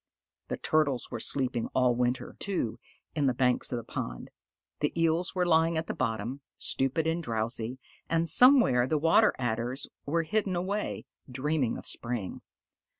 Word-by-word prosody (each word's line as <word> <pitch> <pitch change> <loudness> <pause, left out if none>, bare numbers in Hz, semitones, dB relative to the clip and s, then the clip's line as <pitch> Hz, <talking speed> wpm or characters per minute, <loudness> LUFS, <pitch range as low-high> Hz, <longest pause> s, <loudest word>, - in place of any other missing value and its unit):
The - - -3
Turtles 145 -5 0
were 120 - -4
sleeping 125 -2 0
all 125 -1 +4
winter, 125 +1 -1
too, 185 - -2 0.3
in 145 -3 +1
the 130 - +1
banks 125 0 +1
of 125 - -1
the 120 - -5
pond. - - -6 0.5
The 150 +3 -1
Eels 165 +3 +1
were 180 -1 +1
lying 165 -1 +3
at 160 - -1
the - - -4
bottom, 115 +5 -3 0.2
stupid 135 +4 +1
and 165 +1 0
drowsy, 115 -1 -3 0.3
and 165 0 +1
somewhere 240 - +6
the 155 - +1
Water 165 +2 +4
Adders 120 +2 -2 0.2
were 165 +3 +1
hidden 200 +1 -1
away, 195 +4 -3 0.3
dreaming 135 -1 -1
of - - -10
spring. 120 -5 -4
135 Hz, 155 wpm, -29 LUFS, 120-165 Hz, 0.5 s, somewhere